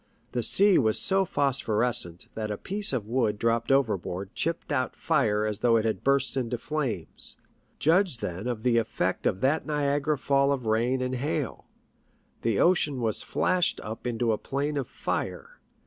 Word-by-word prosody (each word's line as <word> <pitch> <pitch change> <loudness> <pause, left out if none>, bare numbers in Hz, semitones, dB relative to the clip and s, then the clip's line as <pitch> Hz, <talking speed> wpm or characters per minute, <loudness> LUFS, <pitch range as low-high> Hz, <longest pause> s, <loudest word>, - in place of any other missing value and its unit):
The 125 - -1
sea 195 - +5
was 110 -4 +3
so 195 0 +3
phos 140 -5 0
phorescent 105 -6 0
that 110 -1 -4
a 105 - -3
piece 205 - 0
of 125 -6 -2
wood 115 -2 0
dropped 115 +2 0
overboard 100 -7 0
chipped 165 0 -2
out 130 -3 -1
fire 110 -10 +1
as 105 -1 -2
though 115 0 +4
it 110 - 0
had 110 -5 -1
burst 140 0 +1
into 125 -2 -2
flames. 115 - -4 0.4
Judge 170 -2 +3
then 95 +1 -5
of 120 -3 -3
the 120 -2 +3
effect 95 -4 -1
of 95 - -1
that 140 +5 +1
Niagara 145 0 0
fall 140 +1 +2
of 130 -4 -2
rain 120 +4 +1
and 130 0 -2
hail! 140 +1 -3 0.7
The 115 -3 0
ocean 160 -6 +2
was 110 -3 +1
flashed 185 -2 +1
up 110 +3 -6
into 120 -1 0
a 110 - -1
plain 145 +2 -2
of 135 -4 -2
fire. - - -4
125 Hz, 175 wpm, -27 LUFS, 110-145 Hz, 0.7 s, sea